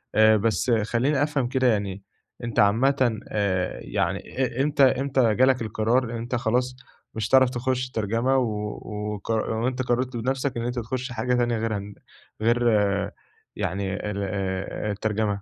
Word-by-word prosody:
آآ، 110 0 +6
بس 115 +3 0
خلّيني 120 +6 +2
أفهم 145 -4 0
كده 130 0 +1
يعني 100 -3 0 0.4
أنت 115 -3 -2
عامةً 120 +3 +3
آآ، 95 -3 -1
يعني - - -1
إ 130 0 -2
إمتى 145 -1 +3
إمتى 130 -4 +3
جالك 130 -1 +3
القرار 115 +2 0
أنت 120 +2 -3
خلاص 125 +2 0 0.4
مش 110 0 -3
هتعرف 130 -1 +6
تخش 130 +1 -1
الترجمة، 115 +3 0
و 105 -4 -2 0.3
وقر 110 +2 -2
وأنت 125 +3 -1
قررت 125 0 -1
بنفسك 130 +2 -1
إن 115 - -2
أنت 120 0 -2
تخش 125 +2 -4
حاجة 120 +2 -1
تانية 120 -1 +1
غيرها 105 -2 -3 0.5
غير 120 +2 +2 0.9
يعني 95 +1 -2 0.2
ال 100 - -4
آآ، 95 +1 -3
الترجمة. 105 -1 -1
115 Hz, 145 wpm, -25 LUFS, 105-130 Hz, 0.9 s, آآ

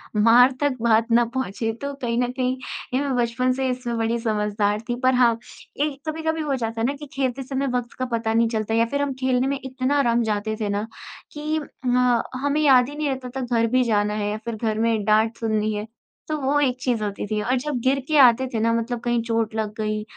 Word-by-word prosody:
मार 235 +4 +6
तक 285 -3 +1
बात 230 0 +3
ना 235 +1 +5
पहुँचे। 225 -3 -2
तो 280 0 -3
कहीं 235 -2 -1
न 245 - -2
कहीं 255 0 -1 0.4
ये 260 - +2
मैं 280 -2 -1
बचपन 245 +2 +1
से 265 0 -1
इसमें 250 -2 -3
बड़ी 230 +1 0
समझदार 210 -2 0
थी। 240 - 0
पर 255 0 +4
हाँ, 240 -2 +4 0.4
एक 290 -2 -1
कभी-कभी 320 0 -2
हो 290 -3 -1
जाता 225 -2 -3
है 230 - +2
ना, 275 - 0
कि 295 +1 -9
खेलते 265 -1 -1
समय 270 +1 -2
वक़्त 240 -1 -5
का 255 - 0
पता 230 -2 -1
नहीं 230 0 +3
चलता। 220 -1 -2
या 230 +1 +3
फ़िर 280 +5 -2
हम 285 -1 -1
खेलने 255 0 +2
में 275 0 -1
इतना 265 +2 0
रम 235 0 +2
जाते 215 0 -1
थे 210 - -1
ना 205 +2 -2 0.5
कि 305 +1 -2 0.3
म 250 -1 +3 0.2
हमें 285 +1 +1
याद 260 -4 +5
ही 290 - -8
नहीं 300 0 -2
रहता 265 -1 -3 0.2
था - - -2 0.2
घर 230 - +3
भी 255 0 +4
जाना 210 -3 +1
है 210 -1 -1
या 210 - -2
फ़िर 235 -1 -3
घर 220 0 -2
में 225 -2 +1
डाँट 220 +2 +2
सुननी 215 -1 0
है। 210 0 -3 0.4
तो 310 - -1
वो 280 +2 +2
एक 260 -3 +1
चीज़ 240 -4 0
होती 205 -1 -3
थी। 215 0 -1
और 245 +5 0
जब 280 -1 -3
गिरके 275 +3 +1
आते 260 0 +6
थे 225 - 0
ना 230 +1 +2
मतलब 230 +1 -1
कहीं 240 -1 +1
चोट 225 -1 -1
लग 215 -1 -2
गई, 215 -1 -2
240 Hz, 235 wpm, -23 LUFS, 225-265 Hz, 0.5 s, मार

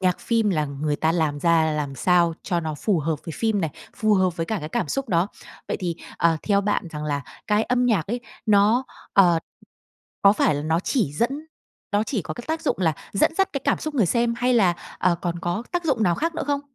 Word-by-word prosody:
nhạc 180 -1 +1
phim 225 -3 +1
là 155 -5 +1
người 145 +1 -2
ta 160 +1 +1
làm 155 -4 0
ra 165 -1 +3
làm 145 -2 -3
sao 170 +2 +3
cho 175 -3 -1
nó 155 -2 -3
phù 190 +3 0
hợp 155 +1 -1
với 165 - -4
phim 220 -3 0
này, 160 -3 -1 0.3
phù 215 -1 +3
hợp 185 -2 +2
với 165 0 -2
cả 220 - -1
cái 150 - -5
cảm 150 - -2
xúc 275 -2 -2
đó. 175 +1 +2 0.4
Vậy - - -1
thì, 175 -2 -2 0.2
ờ, 165 -1 +3
theo 200 -1 +2
bạn 200 -3 -1
rằng 150 -1 -5
là 145 -2 -1 0.3
cái 210 +1 +2
âm 250 +1 +1
nhạc 205 -10 +2
ấy, 240 +4 -3 0.3
nó, 215 +4 +4 0.3
ờ, 175 -4 +5 0.8
có 200 - +7
phải 205 - +2
là 145 - -3
nó 160 +2 +1
chỉ 205 - 0
dẫn 235 - +1 0.6
nó 205 +1 +3
chỉ 220 -3 -2
có - - -6
cái 240 - -8
tác 320 +1 -2
dụng - - 0
là 165 -4 +2 0.2
dẫn 200 - +2
dắt 385 +1 +2
cái 275 - -2
cảm - - +2
xúc 310 -1 -5
người 225 -10 +3
xem 235 +3 +1
hay 250 +1 +2
là, 190 -7 +4 0.2
ờ, 180 - +3
còn 175 -1 -2
có 175 +6 -2
tác 350 -1 -1
dụng 260 -8 +1
nào 175 -4 +3
khác 330 - -2
nữa - - -2
không? 285 -1 0
185 Hz, 245 wpm, -24 LUFS, 165-230 Hz, 0.8 s, có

